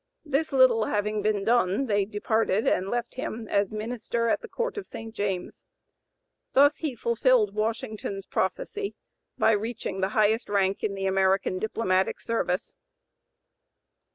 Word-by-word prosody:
This 295 +1 0
little 255 -5 +5
having 210 0 -1
been 205 -1 0
done, 230 +1 +2
they 205 -4 +1
departed 215 0 0
and 190 +1 +1
left 240 +1 -2
him 230 -3 -5
as 200 -1 +1
Minister 230 +1 -2
at - - +1
the 470 - -8
Court 480 +1 -3
of 410 - -6
St. 225 0 -8
James. 195 -4 -3 0.9
Thus 285 +2 +5
he 300 -6 -3
fulfilled 235 -2 +2
Washington's 215 -2 -3
prophecy, 400 - -2 0.4
by - - +4
reaching 215 -3 -2
the 190 - +1
highest 220 +2 +2
rank 195 -1 +1
in 200 - -1
the 195 0 -3
American 190 -1 +2
diplomatic 190 -3 0
service. 210 -6 -2
215 Hz, 140 wpm, -27 LUFS, 195-235 Hz, 0.9 s, little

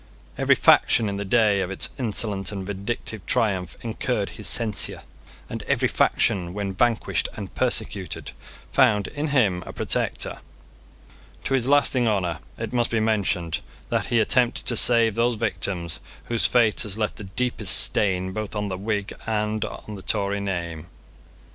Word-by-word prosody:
Every - - +3
faction 115 -2 +4
in 100 - -3
the 100 - -3
day 105 -1 +3
of 90 - -2
its 95 - 0
insolent 105 -4 0
and 95 -2 -5
vindictive 100 +1 -5
triumph 100 -8 0
incurred 115 -2 -2
his 105 - -7
censure; 110 -4 0 0.4
and - - -5
every - - +2
faction, 90 -1 +1
when 100 -2 -3
vanquished 115 +3 0
and - - -7
persecuted, - - -1 0.4
found 105 -2 +3
in 150 +1 -3
him 110 -11 +2
a - - -5
protector. - - -2 1.0
To - - -2
his 130 -2 +2
lasting 140 -3 +3
honour 90 -6 0 0.2
it 115 +1 -5
must 120 -1 +1
be 115 - 0
mentioned 95 -7 0 0.3
that - - -1
he 120 - +2
attempted 120 +2 +2
to 120 - 0
save 115 -1 +5
those 115 +2 +1
victims 85 -5 -2 0.2
whose 115 -1 +2
fate 115 -4 +3
has 105 -2 -3
left 105 -1 -2
the 105 - -8
deepest 105 -2 +3
stain 95 -2 +2
both 110 +2 -5
on 105 -1 -2
the 95 -1 -4
Whig 100 -1 -2
and 105 -1 -1
on 105 - -7
the 100 - -8
Tory 100 0 0
name. 85 -5 -4
105 Hz, 160 wpm, -24 LUFS, 95-115 Hz, 1.0 s, save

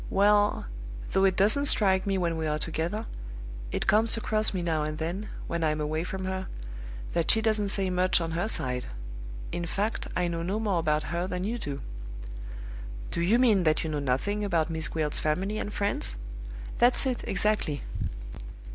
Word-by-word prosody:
Well 205 +1 +4 0.5
though 190 0 +4
it 190 -1 +4
doesn't 215 +9 +4
strike 190 -7 +4
me 195 -1 +2
when 170 -2 +1
we 160 -1 -1
are 150 0 +1
together 165 +8 -2 0.7
it - - -1
comes 225 +2 +5
across 215 -1 +2
me 185 -3 -2
now 160 -2 +1
and 155 0 -2
then, 175 +7 -3 0.2
when 170 -1 -2
I'm 155 -1 +1
away 155 +2 -1
from 190 +1 -4
her, 190 0 -2 0.7
that 170 -1 +1
she 225 - +8
doesn't 215 -2 +2
say 195 -1 +1
much 180 0 +3
on 165 -1 -2
her 175 +5 0
side. 125 - +1 0.6
In 175 0 -2
fact, 205 +6 -1
I 180 -1 +2
know 170 -1 -2
no 190 +5 -1
more 205 -6 +1
about 155 -1 +1
her 175 +2 0
than 180 0 -2
you 230 +4 -1
do." 140 -7 -4 1.3
"Do 170 - -1
you 195 +7 +4
mean 230 -6 +5
that 155 -2 +2
you 160 - -2
know 150 - 0
nothing 145 +11 0
about 170 -5 +1
Miss 160 -1 0
Gwilt's 155 -2 +1
family 190 +8 0
and 205 - -3
friends?" 200 - -1 0.6
"That's 245 +3 +5
it, 255 -2 -1
exactly." 195 -7 +1
185 Hz, 180 wpm, -28 LUFS, 160-205 Hz, 1.3 s, she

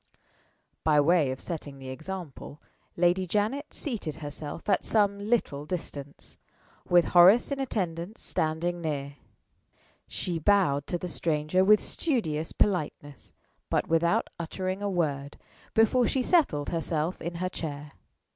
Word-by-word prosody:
By 150 -2 +4
way 155 -1 +4
of 130 0 -4
setting 150 -5 -6
the 135 -1 -9
example, 155 0 -7 0.4
Lady 180 +2 +2
Janet 215 - -1
seated 220 - -3
herself 150 +1 -7
at 195 -3 +2
some 200 -2 +2
little 205 -9 0
distance, 145 -5 -6 0.5
with 175 -1 +5
Horace 185 +10 +7
in 280 - -2
attendance 190 -5 -3
standing 170 +2 -1
near. 145 -3 -4 0.9
She 175 -3 -3
bowed 160 -6 +2
to 175 - -1
the 180 - -5
stranger 160 +1 +1
with 210 +2 +6
studious 165 - -1
politeness, 145 - -2 0.4
but - - 0
without 165 +1 +2
uttering 185 +3 -3
a 205 - -1
word, 145 -6 -2 0.4
before 225 +2 +4
she 265 - 0
settled 255 - +2
herself 165 0 -2
in 170 +1 -4
her 185 +2 -2
chair. 150 -4 -6
170 Hz, 130 wpm, -28 LUFS, 150-200 Hz, 0.9 s, Horace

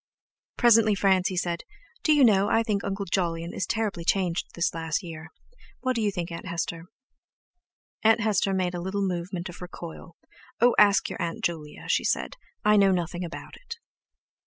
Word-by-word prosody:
Presently 225 -3 +5
Francie 190 -1 +2
said: 175 -1 -1 0.4
"Do 310 - +2
you 295 -2 +5
know, 205 -4 +4
I 225 - +3
think 210 -3 -1
Uncle 195 0 -3
Jolyon 170 -2 -1
is 180 - -3
terribly 215 -6 -2
changed 180 -1 0
this 170 - 0
last 165 +2 -2
year. 160 -2 -8 0.5
What 255 -1 0
do 230 - 0
you 210 - +2
think, 175 -3 -4
Aunt 170 +3 -7
Hester?" 170 0 -3 1.2
Aunt 225 +1 +4
Hester 205 -2 +1
made 185 -2 0
a 175 - -4
little 195 +3 -2
movement 180 +1 -4
of 175 0 -11
recoil: 170 -1 -9 0.4
"Oh, 240 +1 +5
ask 205 -1 +5
your - - -6
Aunt 165 -1 -3
Julia!" 155 -3 -4
she - - +2
said; - - -1 0.3
"I 210 0 +5
know 195 -1 +5
nothing 175 0 -2
about 170 -1 -8
it." 470 -2 -9
185 Hz, 175 wpm, -26 LUFS, 170-210 Hz, 1.2 s, Presently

